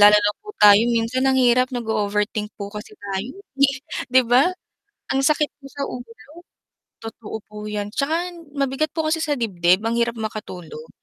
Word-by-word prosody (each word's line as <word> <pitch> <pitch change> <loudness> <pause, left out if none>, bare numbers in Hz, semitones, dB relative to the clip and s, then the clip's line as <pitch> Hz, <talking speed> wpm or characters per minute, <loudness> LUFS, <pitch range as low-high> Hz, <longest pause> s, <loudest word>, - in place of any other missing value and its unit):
Lalo 205 0 +9
na 205 0 +3
po 425 - -17
tayo 205 0 +8
minsan 240 +3 +1
ang 265 - +3
hirap 255 0 +4
nag-o 240 -4 -3 0.2
overthink 210 +1 -1
po 200 -1 -7
kasi 220 - -9
tayo, 200 - -4 0.4
eh, 275 -1 -3 0.3
'di 260 +1 +6
ba, 245 +7 +5 0.6
ang 270 - +2
sakit 300 +1 +2
po 275 - -12
sa 280 0 -4
ulo. 245 -1 -7 0.9
Totoo 225 -1 -7
po 210 - -15
'yan 205 -1 -4
tsaka 320 +5 0 0.3
mabigat 275 +2 0
po 320 - -1
kasi 325 +1 +1
sa 300 -2 0
dibdib 185 -4 +2
ang 225 +1 0
hirap 235 0 0
makatulog 180 -7 -7
230 Hz, 175 wpm, -22 LUFS, 210-270 Hz, 0.9 s, Lalo